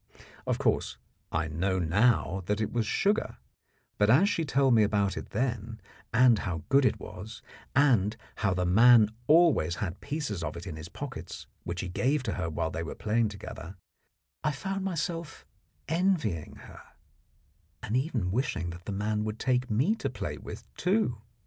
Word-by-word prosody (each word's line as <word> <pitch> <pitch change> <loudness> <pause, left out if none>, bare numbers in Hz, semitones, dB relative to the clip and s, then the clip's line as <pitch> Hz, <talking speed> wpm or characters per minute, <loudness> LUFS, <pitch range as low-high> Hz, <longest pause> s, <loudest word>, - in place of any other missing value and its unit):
Of - - +1
course, - - 0 0.3
I 80 0 0
know 90 +5 -1
now 95 +2 +2
that 105 +1 0
it 110 - -2
was 115 -3 0
sugar; 205 - +1 0.6
but 105 0 +4
as 150 - +6
she 170 -4 0
told 135 -3 +3
me 110 - +5
about 100 -2 +2
it - - -6
then, 115 -2 -2 0.3
and 120 -2 +5
how 85 -5 -3
good 135 0 +5
it - - +2
was, 105 +4 -9 0.3
and 115 -7 +3 0.2
how 95 -3 +1
the 90 0 0
man 110 +4 +7 0.2
always 155 - +4
had 90 -2 -4
pieces 140 - -3
of 75 +1 -4
it 85 - -8
in 85 -6 -6
his 80 +2 -8
pockets, - - -7 0.2
which 85 0 -3
he 95 - -4
gave 130 +9 0
her 90 -7 -2
while 80 +1 -2
they 80 - -3
were 80 - -5
playing 110 +1 +1
together, 95 -3 -8 0.7
I 150 - +1
found 195 +6 -3
myself 170 -3 -3 0.4
envying 160 - 0
her, - - -13 1.0
and 105 - -2
even 125 - 0
wishing 100 -7 -1
that 85 +1 -11
the - - -4
man 105 +2 -1
would 110 0 -3
take 125 0 0
me 130 - +2
to - - -2
play - - -5
with, - - -8
too. 180 - +1
110 Hz, 170 wpm, -29 LUFS, 95-135 Hz, 1.0 s, man